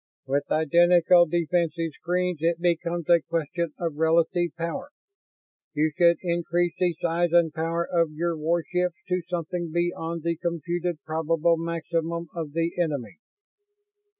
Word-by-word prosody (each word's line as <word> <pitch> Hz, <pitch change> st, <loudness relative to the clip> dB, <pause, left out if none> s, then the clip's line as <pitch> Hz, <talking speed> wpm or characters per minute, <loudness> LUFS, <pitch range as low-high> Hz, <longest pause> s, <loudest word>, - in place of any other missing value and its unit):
"With 140 Hz, +1 st, -1 dB
identical 175 Hz, +2 st, +5 dB
defensive 170 Hz, 0 st, 0 dB
screens 180 Hz, 0 st, -1 dB
it 165 Hz, 0 st, +1 dB
becomes 170 Hz, -1 st, -1 dB
a 170 Hz, -1 st, +5 dB
question 165 Hz, +1 st, -2 dB
of 165 Hz, -4 st, -3 dB
relative 170 Hz, +2 st, +2 dB
power. 170 Hz, -, -4 dB, 0.9 s
You 155 Hz, +1 st, +2 dB
should 170 Hz, -1 st, +5 dB
increase 175 Hz, 0 st, 0 dB
the 175 Hz, -2 st, +1 dB
size 170 Hz, 0 st, 0 dB
and 170 Hz, -2 st, +4 dB
power 165 Hz, +1 st, -1 dB
of 170 Hz, -2 st, +1 dB
your 170 Hz, +2 st, -1 dB
warships 170 Hz, +2 st, -1 dB
to 180 Hz, 0 st, +1 dB
something 175 Hz, 0 st, -3 dB
beyond 170 Hz, -1 st, -2 dB
the 170 Hz, 0 st, -1 dB
computed 170 Hz, -1 st, -3 dB
probable 160 Hz, +1 st, +1 dB
maximum 170 Hz, 0 st, -3 dB
of 160 Hz, -4 st, -5 dB
the 165 Hz, +1 st, 0 dB
enemy. 140 Hz, -, -3 dB
170 Hz, 130 wpm, -26 LUFS, 160-175 Hz, 0.9 s, identical